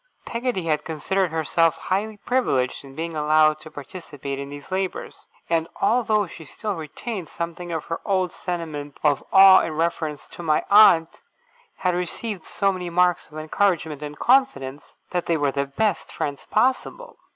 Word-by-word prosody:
Peggotty 235 Hz, -5 st, -2 dB
had 155 Hz, -2 st, 0 dB
considered 180 Hz, +4 st, -1 dB
herself 165 Hz, +1 st, +2 dB
highly 205 Hz, +3 st, -2 dB
privileged 200 Hz, -, 0 dB
in 135 Hz, -1 st, -13 dB
being 165 Hz, +1 st, -4 dB
allowed 155 Hz, 0 st, +3 dB
to 155 Hz, +1 st, -11 dB
participate 145 Hz, -3 st, -7 dB
in 140 Hz, 0 st, -6 dB
these 145 Hz, +4 st, -10 dB
labours; 190 Hz, 0 st, -4 dB, 0.2 s
and, 165 Hz, -1 st, +1 dB
although 215 Hz, -1 st, +2 dB
she 170 Hz, -2 st, -11 dB
still 210 Hz, +7 st, -4 dB
retained 175 Hz, +3 st, -6 dB
something 170 Hz, +1 st, -5 dB
of 160 Hz, -2 st, -3 dB
her 165 Hz, -, -4 dB
old 185 Hz, -3 st, 0 dB
sentiment 155 Hz, -5 st, -5 dB
of 145 Hz, -2 st, +2 dB
awe 190 Hz, -1 st, +9 dB
in 160 Hz, -, -3 dB
reference 160 Hz, -2 st, -2 dB
to -, -, -10 dB
my 155 Hz, -2 st, +1 dB
aunt, 175 Hz, -6 st, +6 dB, 0.6 s
had 180 Hz, -1 st, 0 dB
received 180 Hz, +2 st, -4 dB
so 195 Hz, -1 st, +1 dB
many 180 Hz, -2 st, -5 dB
marks 180 Hz, 0 st, +2 dB
of 155 Hz, -, -11 dB
encouragement 160 Hz, -2 st, 0 dB
and 150 Hz, 0 st, -7 dB
confidence, 195 Hz, -, +1 dB, 0.2 s
that 180 Hz, -1 st, -2 dB
they 165 Hz, -, +2 dB
were 145 Hz, -2 st, +1 dB
the 140 Hz, +1 st, -1 dB
best 205 Hz, +6 st, -1 dB
friends 145 Hz, -1 st, -4 dB
possible. 470 Hz, -, 0 dB
170 Hz, 160 wpm, -23 LUFS, 150-195 Hz, 0.6 s, awe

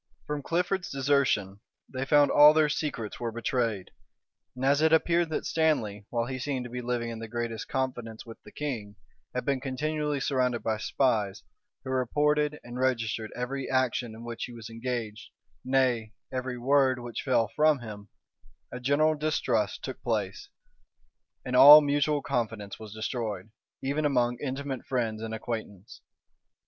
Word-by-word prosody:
From 150 Hz, -1 st, -3 dB
Clifford's 180 Hz, +4 st, -1 dB
desertion, 135 Hz, -8 st, +1 dB, 0.3 s
they 130 Hz, 0 st, -4 dB
found 145 Hz, +1 st, +4 dB
that -, -, -1 dB
all 150 Hz, +1 st, +8 dB
their 155 Hz, -1 st, +4 dB
secrets 140 Hz, -9 st, -3 dB
were 120 Hz, -1 st, -2 dB
betrayed; 115 Hz, -4 st, -2 dB, 0.6 s
and 130 Hz, +1 st, -3 dB
as 140 Hz, +2 st, +3 dB
it 160 Hz, 0 st, +4 dB
appeared 170 Hz, +1 st, +3 dB
that 155 Hz, -, -3 dB
Stanley, 115 Hz, -11 st, 0 dB
while 115 Hz, -1 st, -1 dB
he 130 Hz, +1 st, -5 dB
seemed 130 Hz, -1 st, -3 dB
to 120 Hz, -, -8 dB
live 120 Hz, -1 st, -1 dB
in 115 Hz, -1 st, -5 dB
the 115 Hz, -, -6 dB
greatest 115 Hz, -1 st, -4 dB
confidence 120 Hz, -4 st, -3 dB
with 115 Hz, -1 st, -12 dB
the -, -, -14 dB
king, 115 Hz, -9 st, -5 dB, 0.4 s
had 125 Hz, -, -2 dB
been 135 Hz, -2 st, 0 dB
continually 150 Hz, +2 st, -2 dB
surrounded 125 Hz, -3 st, 0 dB
by 110 Hz, -1 st, 0 dB
spies, 110 Hz, -4 st, 0 dB, 0.4 s
who 130 Hz, -, -5 dB
reported 150 Hz, +3 st, +1 dB
and 120 Hz, +1 st, -7 dB
registered 115 Hz, -4 st, -1 dB
every 130 Hz, +2 st, -4 dB
action 125 Hz, -3 st, 0 dB
in 115 Hz, -, -10 dB
which 120 Hz, -1 st, -5 dB
he -, -, -10 dB
was 115 Hz, -1 st, -9 dB
engaged, 115 Hz, -2 st, -4 dB, 0.3 s
nay, 125 Hz, -4 st, +1 dB, 0.2 s
every 130 Hz, -1 st, -3 dB
word 130 Hz, +1 st, +3 dB
which 120 Hz, -1 st, -5 dB
fell 120 Hz, -5 st, +1 dB
from 150 Hz, -3 st, +3 dB
him, 105 Hz, -3 st, -9 dB, 0.6 s
a 125 Hz, -, -6 dB
general 145 Hz, +5 st, +3 dB
distrust 135 Hz, -8 st, -1 dB
took 130 Hz, -, -6 dB
place, 105 Hz, -5 st, -2 dB, 1.0 s
and 125 Hz, -, -2 dB
all 145 Hz, +4 st, +11 dB
mutual 145 Hz, 0 st, +1 dB
confidence 110 Hz, -4 st, -3 dB
was 110 Hz, -2 st, -9 dB
destroyed, 110 Hz, -2 st, -4 dB, 0.3 s
even 140 Hz, +3 st, -1 dB
among 125 Hz, -4 st, +1 dB
intimate 135 Hz, -1 st, -4 dB
friends 115 Hz, -4 st, -2 dB
and 110 Hz, 0 st, -4 dB
acquaintance. 110 Hz, -3 st, -6 dB
125 Hz, 155 wpm, -28 LUFS, 115-140 Hz, 1.0 s, all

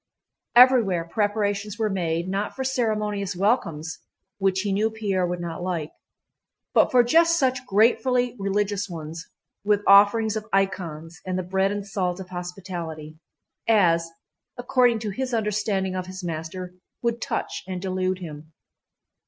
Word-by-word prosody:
Everywhere 235 Hz, -9 st, +6 dB
preparations 205 Hz, +1 st, -1 dB
were 220 Hz, -2 st, +1 dB
made 170 Hz, -3 st, -1 dB
not 195 Hz, +2 st, -2 dB
for 265 Hz, -, -3 dB
ceremonious 210 Hz, -6 st, -1 dB
welcomes 165 Hz, -6 st, 0 dB, 0.4 s
(which 190 Hz, -1 st, +1 dB
he 205 Hz, 0 st, -2 dB
knew 215 Hz, +3 st, +2 dB
Pierre 200 Hz, -5 st, -1 dB
would 175 Hz, 0 st, -3 dB
not 170 Hz, -1 st, -5 dB
like), 175 Hz, -4 st, -3 dB, 0.8 s
but -, -, +5 dB
for 250 Hz, -1 st, +5 dB
just 335 Hz, +7 st, +4 dB
such 260 Hz, -4 st, +1 dB
gratefully 245 Hz, +4 st, +2 dB
religious 205 Hz, 0 st, -1 dB
ones, 165 Hz, 0 st, -7 dB, 0.4 s
with 205 Hz, 0 st, +2 dB
offerings 205 Hz, +2 st, +6 dB
of 215 Hz, 0 st, -4 dB
icons 170 Hz, -5 st, -2 dB
and 185 Hz, 0 st, -2 dB
the 185 Hz, -, -2 dB
bread 190 Hz, +2 st, +1 dB
and 205 Hz, -1 st, -4 dB
salt 185 Hz, -2 st, -2 dB
of 185 Hz, -1 st, -8 dB
hospitality, 175 Hz, -4 st, -7 dB, 0.5 s
as, 170 Hz, -7 st, +3 dB, 0.5 s
according 245 Hz, -1 st, +3 dB
to 215 Hz, -2 st, -4 dB
his 255 Hz, +4 st, -2 dB
understanding 205 Hz, -3 st, -1 dB
of 185 Hz, -1 st, -3 dB
his 185 Hz, 0 st, -8 dB
master, 175 Hz, +2 st, -5 dB, 0.3 s
would 235 Hz, -1 st, -1 dB
touch -, -, -3 dB
and 185 Hz, -1 st, -4 dB
delude 185 Hz, 0 st, -1 dB
him. 155 Hz, -3 st, -9 dB
195 Hz, 145 wpm, -24 LUFS, 180-220 Hz, 0.8 s, Everywhere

